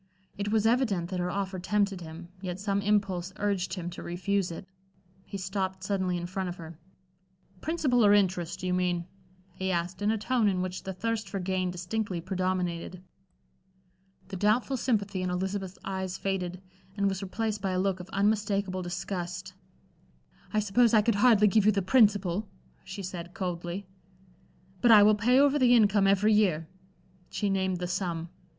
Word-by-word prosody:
It 205 +1 -3
was 220 -1 +2
evident 225 -8 +1
that 185 - -2
her 180 0 -1
offer 195 0 -3
tempted 200 0 0
him, 165 +1 -9
yet 180 -1 -4
some 200 0 0
impulse 195 -3 0
urged 200 -2 -1
him 175 -2 -5
to - - -8
refuse 185 +2 -1
it. 170 +3 -8 0.6
He 200 - -5
stopped 190 0 -3
suddenly 190 -2 0
in 175 - -4
front 185 +1 -3
of 175 - -5
her. 165 -3 -10 0.8
"Principal 280 -7 +1
or 205 - +6
interest, 185 -3 +1
do - - -4
you 180 - 0
mean?" 180 -1 0 0.5
he 190 +1 -3
asked, 175 +2 -2
in 205 - +1
a 220 - +2
tone 230 +1 +1
in 190 -2 +1
which 185 0 -4
the 190 - -5
thirst 225 +3 -2
for 195 - -3
gain 185 0 -1
distinctly 180 +2 -3
predominated. 185 -1 -2 1.3
The 190 - -5
doubtful 215 +7 +2
sympathy 205 -6 0
in 185 - -1
Elizabeth's 190 +1 -3
eyes 190 -1 -3
faded, 185 -2 -3 0.3
and 200 0 +2
was 195 0 -2
replaced 215 +2 -3
by 195 - -1
a 185 - 0
look 190 -1 0
of 180 - -9
unmistakable 200 -2 0
disgust. 180 +1 -5 1.0
"I 215 - +2
suppose 225 +3 +3
I 215 - +5
could 230 - +2
hardly 220 -4 +6
give 210 0 +3
you - - +7
the 200 -2 0
principal," 205 -3 +3 0.4
she 190 +1 -7
said, 175 -1 -7
coldly. 180 0 -4 1.0
"But 240 - +4
I 215 -2 +9
will 215 +1 +6
pay 230 +5 +3
over 285 +1 +4
the 245 -2 +6
income 205 -3 +4
every 200 +2 +4
year." 180 -7 +2 0.6
She 205 -2 -1
named 190 -1 0
the 180 - -3
sum. 175 -2 -3
190 Hz, 175 wpm, -28 LUFS, 180-210 Hz, 1.3 s, I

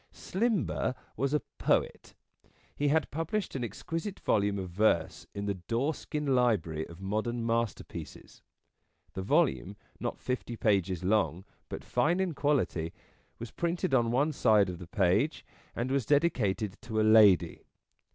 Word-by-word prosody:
Slimber 200 - -1 0.2
was 140 0 0
a 150 - +1 0.2
poet. - - 0 0.6
He 145 - 0
had 150 0 +1
pub 165 +2 -3
lished 215 -3 -2
an 130 - -3
exquisite 165 - -5
volume 100 -1 +1
of 95 -2 -5
verse 100 -1 +1
in 100 0 -3
the 100 - 0
Doreskin 135 - -2
Library 100 -11 +1
of 85 +1 -12
modern 110 +4 -2
Masterpieces. 115 -1 -4 0.7
The 95 - -4
volume, 115 - +1 0.2
not - - -3
fifty 125 -2 -4
pages 95 -6 +1
long, 95 -2 +1 0.2
but - - -6
fine 170 +4 +1
in 185 -3 0
quality, 135 - 0 0.4
was 115 -2 -7
printed 170 -1 -1
on 120 -3 +3
one 140 +6 +2
side 105 -8 +3
of 90 -2 -6
the 90 - -9
page, 100 - +1 0.3
and 125 +3 -2
was 135 -5 0
dedicated 110 - +1
to 110 -2 -3
a - - +4
Lady. 105 -6 +5
115 Hz, 145 wpm, -30 LUFS, 100-145 Hz, 0.7 s, Lady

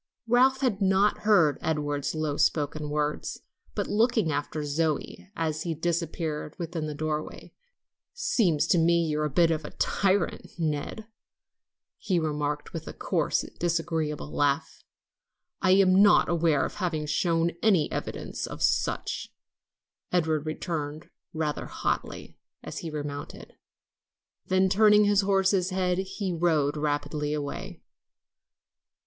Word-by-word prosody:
Ralph 255 +3 +4
had 225 -7 0
not 195 +2 +3
heard 175 -9 +4
Edward's 145 -2 -1
low 155 -2 -1
spoken 150 0 0
words, 150 0 -2 0.3
but - - -1
looking 220 -5 +2
after 145 +1 -3
Zoe, 155 +4 -2
as 155 -3 -2
she 165 -1 -2
disappeared 165 -2 -2
within 165 -2 -4
the 150 - -5
doorway, 155 0 -4 0.6
"Seems 240 - +1
to 175 - +4
me 170 +1 +3
you're 150 -1 0
a - - -1
bit 165 +4 +3
of 155 -1 -1
a - - -6
tyrant, 195 -1 0
Ned," 160 +6 -3 0.9
he 190 -4 0
remarked 150 -2 -2
with 165 -2 -6
a - - -6
coarse, - - 0 0.2
disagreeable 165 -3 -1
laugh. 140 -1 0 0.8
"I 185 - +2
am 190 0 +5
not 205 0 +6
aware 165 -4 +2
of - - -7
having 165 -6 -1
shown 165 +2 +1
any 195 -8 +3
evidence - - -4
of - - -7
being - - -4
such," - - -1 0.8
Edward 160 -3 +1
returned 155 -1 -4 0.2
rather 155 -2 -2
haughtily, - - -3 0.2
as - - -6
he 165 - -5
remounted. 145 -2 -7 0.9
Then, 185 0 +3
turning 210 +1 +5
his 205 -1 +4
horse's 195 -1 +2
head, 185 -1 0
he 190 0 -3
rode 160 -4 +1
rapidly 150 0 -1
away. 160 +5 -6
165 Hz, 130 wpm, -27 LUFS, 150-190 Hz, 0.9 s, not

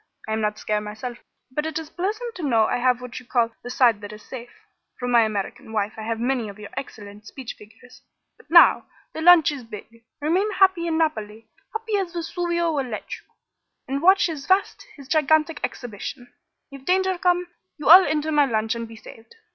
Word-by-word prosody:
I 220 - -2
am 220 - -1
not 210 0 -1
scare, 210 -1 -1
myself, 215 +4 -7 0.3
but 300 +4 -2
it 320 -1 -4
is 320 -1 -6
pleasant 430 +6 -3
to 370 - -8
know 235 -7 +3
I - - 0
have 250 0 +1
what 250 -1 -7
you 255 - -16
call 235 -2 +1
the 245 - -8
side 240 -4 +3
that 205 0 -8
is 210 0 -11
safe. 245 -2 -9 0.5
From 245 0 -3
my 235 -1 +6
American 215 0 -3
wife 210 -1 -1
I 220 - -8
have 225 +1 -3
many 245 -2 -1
of 200 - -11
your 210 -1 -10
excellent 210 -5 -9
speech 260 -1 -8
figures. 220 +4 -17 0.3
But - - -23
now! - - +6 0.3
The 315 - -5
launch 340 -2 +7
is 280 -4 -7
big. 230 +1 -12 0.2
Remain 365 +8 0
happy 380 -3 +3
in 320 -1 0
Naples 220 -9 -2 0.3
happy 445 -1 -2
as 375 -3 -3
Vesuvio 345 0 -1
will 275 -4 -1
let 220 -3 -6
you - - -23 0.6
and 275 +1 -2
watch 380 +3 +5
his 305 -5 -5
vast, 400 +4 +1
his 280 -3 -13
gigantic 310 +1 +2
exhibition. 245 +2 -6 0.4
If 275 -1 -11
danger 375 +2 +1
come, 355 -1 +1 0.3
you 300 - -5
all 360 +5 +10
enter 310 0 -1
my 295 -1 +4
launch 220 -2 0
and 230 -1 -5
be 225 - -12
saved. 225 - -14
265 Hz, 205 wpm, -23 LUFS, 225-335 Hz, 0.6 s, all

